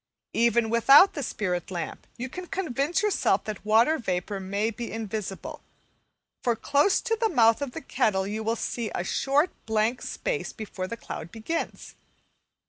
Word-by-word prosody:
Even 235 -1 +3
without 275 - +7
the 290 - -4
spirit 185 -8 -2
lamp, 175 -3 -5
you 250 +1 -4
can 360 +7 -8
convince 340 - -1
yourself 420 -2 +2
that 215 -2 -6
water 230 +9 +4
vapour 195 -2 -2
may 200 +4 -1
be 235 +1 -6
invisible; 215 -3 -5 0.8
for 240 -2 +2
close 285 - +2
to 455 -2 0
the 450 0 +1
mouth 230 - +4
of 275 -3 -3
the - - -6
kettle 195 -7 +1
you 210 +2 -3
will 225 +1 0
see 235 -1 -3
a - - -1
short 280 - +1 0.2
blank 220 +2 +1
space 480 -3 -3
before 200 -4 -5
the 230 - -5
cloud 170 - -7
begins. 230 +9 -4
230 Hz, 160 wpm, -27 LUFS, 210-285 Hz, 0.8 s, without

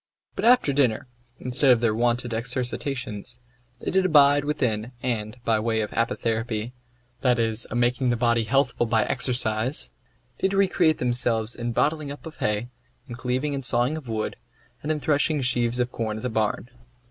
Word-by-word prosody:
But - - -2
after 240 - +5
dinner, 130 -6 +1 0.3
instead 130 +2 +2
of 125 -2 +6
their 115 -2 +2
wonted 120 +1 0
exercitations, 120 -1 -3 0.4
they - - -2
did 190 +1 +3
abide 145 -4 +5
within, 125 -6 -1
and, 110 -2 -2
by 110 -1 +2
way 110 0 0
of 105 - -4
apotherapy 115 -1 -1 0.5
(that 125 -1 +2
is, 115 -1 0
a - - -5
making 125 +1 +1
the 120 - +1
body 120 -1 +2
healthful 120 0 +1
by 110 -1 +2
exercise), 125 0 0 0.5
did 190 +1 +1
recreate 185 -5 +3
themselves 120 -2 0
in 120 0 -4
bottling 150 +3 0
up 145 - -10
of 160 - -9
hay, 105 +3 -1 0.4
in 120 - -7
cleaving 125 +4 -2
and 135 -1 -3
sawing 125 +4 +2
of 155 -5 -8
wood, 110 -1 -3 0.4
and 150 - -2
in 155 - -1
threshing 150 +1 +1
sheaves 120 -1 +1
of 125 0 0
corn 110 -2 -3
at 110 - -8
the 125 - -1
barn. 110 +2 -1
120 Hz, 170 wpm, -25 LUFS, 115-140 Hz, 0.5 s, of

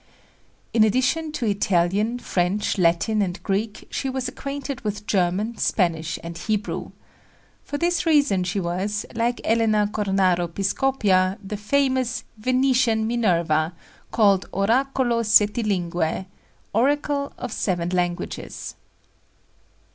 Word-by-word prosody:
In 225 - +5
addition 260 +8 +1
to 260 - -2
Italian, 200 +2 +1
French, 195 -2 -1
Latin 175 +5 +2
and 185 -2 -1
Greek, 205 +2 -2
she 270 - -2
was 260 -1 -2
acquainted 275 0 -5
with 210 -1 -4
German, 200 +4 0
Spanish 165 -4 0
and 170 0 -6
Hebrew. 210 +4 -3 0.7
For 290 - -4
this 345 +2 +1
reason 285 - +3
she 180 +3 -2
was, 190 +4 -2
like 235 +1 -1
Elena 220 -2 +2
Cornaro 190 -4 +1
Piscopia, 195 0 +1
the 195 +2 -5
famous 260 +3 0 0.2
"Venetian 250 -2 +2
Minerva," 170 -8 +1 0.4
called 200 -4 +3
Oracolo 240 +4 +1
Settilingue 200 -6 +1 0.5
Oracle 280 +4 +1
of 250 - -5
Seven 175 -5 -1
Languages. 175 -1 -3
210 Hz, 110 wpm, -23 LUFS, 185-245 Hz, 0.7 s, In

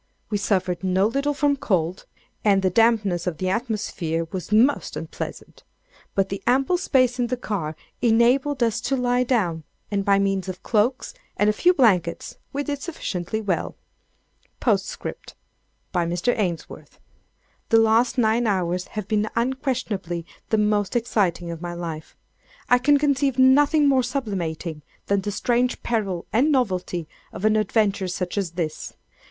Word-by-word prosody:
We 205 - 0
suffered 190 -3 0
no 190 +1 +2
little 275 +6 0
from 285 0 +2
cold, 180 -6 -1 0.4
and 195 -2 +3
the 185 - +2
dampness 205 -5 +2
of 170 -4 -2
the 185 +3 -1
atmosphere 190 -7 -2
was 185 0 -5
most 235 +7 +3
unpleasant; - - -7 0.5
but 195 -1 +1
the 195 - -4
ample 270 +8 +3
space 255 -7 +2
in 245 - +1
the 255 - -2
car 170 -10 -3 0.3
enabled 245 +4 +3
us 230 0 0
to 270 - 0
lie 250 0 +2
down, 185 -11 0 0.3
and 200 -1 0
by 200 0 +4
means 195 -1 0
of 185 0 -7
cloaks 230 +3 0 0.2
and 210 0 +4
a - - -5
few 355 +11 +4
blankets, 195 - +1
we 285 +1 -2
did 285 -1 -4
sufficiently 220 - -4
well. 190 -5 -2 0.8
"P.S. 200 -5 0 0.9
(by 175 -2 0
Mr. 175 +8 0
Ainsworth.) 180 -7 -4 0.7
The 225 - +5
last 225 +3 +3
nine 230 0 +2
hours 180 -3 0
have 210 -3 -3
been 215 0 0
unquestionably 235 - -2 0.2
the 220 - +2
most 210 -1 +1
exciting 190 -7 0
of 165 -1 -7
my 175 -1 -5
life. 165 -2 -7 0.5
I 245 - +6
can 290 +3 +4
conceive 280 -2 +1
nothing 290 +3 +5
more 265 -2 +4
sublimating 185 - -3 0.2
than 200 -1 +1
the 205 - -3
strange 245 +4 0
peril 200 -7 -1
and 265 +8 +3
novelty 185 - -1 0.2
of 210 - -5
an 215 0 +4
adventure 210 -2 +1
such 180 0 -3
as 180 -4 -3
this. 165 -3 -4
210 Hz, 155 wpm, -23 LUFS, 185-250 Hz, 0.9 s, I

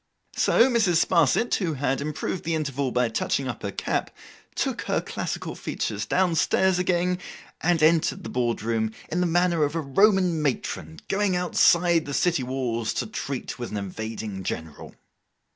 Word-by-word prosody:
So, 235 - +4
Mrs. 215 -10 +3
Sparsit, 170 - +2
who 170 -6 -1
had 135 0 -1
improved 155 +4 -3
the 165 0 -1
interval 140 -3 -1
by 125 0 +2
touching 130 +4 -1
up 120 - -5
her 100 - -3
cap, - - -2 0.5
took - - -1
her - - +1
classical - - -4
features 105 -1 -3
down 185 -2 +2
stairs 185 +3 +2
again, 180 0 +1 0.4
and 170 -2 +2
entered 165 +4 +3
the - - -6
board 120 -3 -1
room 110 -1 -1 0.2
in 175 - 0
the 180 - +2
manner 170 -1 +2
of 145 +2 -1
a 165 - 0
Roman 180 +2 +3
matron 80 - -3
going 195 -1 +1
outside 170 -2 +3
the 140 - -3
city 175 -5 +2
walls 125 -3 -2
to - - -1
treat 140 - -5
with 120 - -4
an 105 - -4
invading 105 0 -5
general. 80 -3 -6
155 Hz, 165 wpm, -25 LUFS, 120-180 Hz, 0.5 s, So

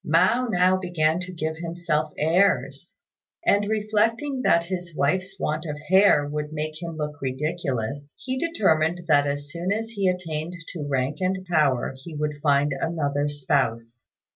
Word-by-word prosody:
Mao 185 +11 +3
now 185 -1 +3
began 175 -3 +1
to 180 0 -6
give 160 -2 -3
himself 165 -2 -2
airs; 160 -3 +1 0.5
and, 205 -7 +3
reflecting 225 +5 0
that 170 -8 +3
his 175 -2 -5
wife's 185 +7 0
want 155 +1 -1
of 150 -1 -4
hair 190 -6 +5
would 150 0 -4
make 155 +1 -4
him 165 -2 -5
look 150 -1 -4
ridiculous, 140 -1 -3
he 260 0 -4
determined 175 - +1
that 145 -2 +4
as 145 0 -3
soon 175 +4 -2
as 225 +2 -1
he 200 -4 0
attained 170 -2 -2 0.2
to 150 -5 -5
rank 135 +1 0
and 185 0 -1
power 150 -8 +2
he 165 -1 -8
would 150 -1 -3
find 145 -1 +3
another 145 -1 -1
spouse. 120 -5 -1
160 Hz, 155 wpm, -25 LUFS, 145-185 Hz, 0.5 s, hair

